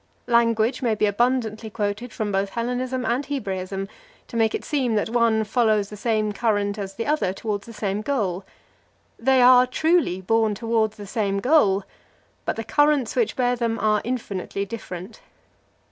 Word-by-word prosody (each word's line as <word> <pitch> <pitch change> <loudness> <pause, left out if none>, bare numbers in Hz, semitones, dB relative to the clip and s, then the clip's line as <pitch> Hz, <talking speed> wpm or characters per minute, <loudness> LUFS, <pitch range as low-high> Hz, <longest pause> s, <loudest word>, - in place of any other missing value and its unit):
Language 235 0 +2
may 230 -4 +1
be 215 - +2
abundantly 220 0 0
quoted 210 +3 -3
from 215 -2 -3
both 195 0 0
Hellenism 250 +3 -2
and 250 +4 0
Hebraism 195 -8 -4 0.4
to - - -9
make 225 -1 +2
it - - -5
seem 260 -6 0
that 215 +1 0
one 230 -2 +3
follows 215 -2 +1
the 210 - -8
same 215 0 0
current 205 -2 0
as 195 -1 -5
the 230 - -3
other 295 -11 0
towards 205 0 -4
the - - -9
same 205 -1 -2
goal. 205 -8 -1 0.8
They 260 +1 +4
are, 250 0 +7
truly, 315 - +1
borne 220 +2 +1
towards 225 -1 0
the 205 - -8
same 200 -2 -1
goal; 205 -7 +3 0.6
but - - -1
the 225 - -4
currents 290 +1 +2
which 470 -3 +1
bear 245 -1 +1
them 230 -1 -1
are 215 0 +2
infinitely 200 -5 -3
different. 190 -1 -8
220 Hz, 165 wpm, -23 LUFS, 205-245 Hz, 0.8 s, are